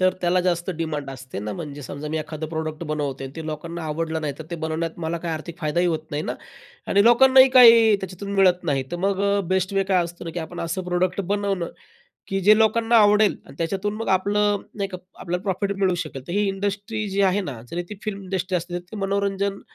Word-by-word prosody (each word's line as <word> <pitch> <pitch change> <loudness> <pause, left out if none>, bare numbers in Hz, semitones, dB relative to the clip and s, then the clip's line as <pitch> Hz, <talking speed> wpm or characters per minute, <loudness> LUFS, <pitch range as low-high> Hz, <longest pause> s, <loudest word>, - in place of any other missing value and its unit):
तर 185 0 +3
त्याला 180 +1 +2
जास्त 175 0 0
डिमांड 150 -4 -3
असते 130 -3 -8
ना. 105 - -4
म्हणजे 145 -5 -7
समजा 145 +3 -6
मी 160 - -1
एखादं 155 0 -5
प्रॉडक्ट 160 0 -4
बनवतो 145 -3 -3
आणि 135 - -8
ते 160 - -5
लोकांना 165 +2 -5
आवडलं 160 +1 -2
नाही, 150 -2 -2
तर 160 - -7
ते 170 - -3
बनवण्यात 165 +1 -3
मला 165 +1 -2
काही 165 -1 -3
आर्थिक 165 +2 -8
फायदाही 170 +2 +1
होत 160 -2 -2
नाही 150 +1 -2
ना - - -3 0.5
आणि 200 - +4
लोकांनाही 260 +2 +7
काही 230 -4 +8
त्याच्यातून 190 +2 -6
मिळत 185 -2 +4
नाही. 140 -5 +1
तर 175 - -3
मग 200 -1 0
अ, 200 0 +2
बेस्ट 185 0 +1
वे 195 0 +2
काय 180 -2 +4
असतो 170 +1 -9
ना, 165 - -4
की - - -2
आपण 170 +1 -6
असं 170 +3 -2
प्रॉडक्ट 180 +2 0
बनवणं, 200 -4 0 0.6
की 195 0 -1
जे 215 0 +8
लोकांना 225 +1 +3
आवडेल 210 -1 +5
आणि 135 - -13
त्याच्यातून 195 +5 -2
मग 225 - -4
आपलं 205 +2 +2 0.2
नाही 200 -2 -2
का 185 - -6 0.2
आपल्याला 180 +1 -3
प्रॉफिट 200 0 -1
मिळू 190 -2 +2
शकेल. 135 -4 -8
तर - - -5
ही 205 +2 +1
इंडस्ट्री 205 +2 -3
जी 195 +1 0
आहे 200 +3 0
ना, 140 - -6
जरी 175 +1 -2
ती - - -5
फिल्म 200 -2 -4
इंडस्ट्री 185 -1 -2
असते, 175 +1 -5
तर 175 - -2
ती 220 - -7
मनोरंजन 200 0 -1
180 Hz, 225 wpm, -23 LUFS, 160-200 Hz, 0.6 s, काही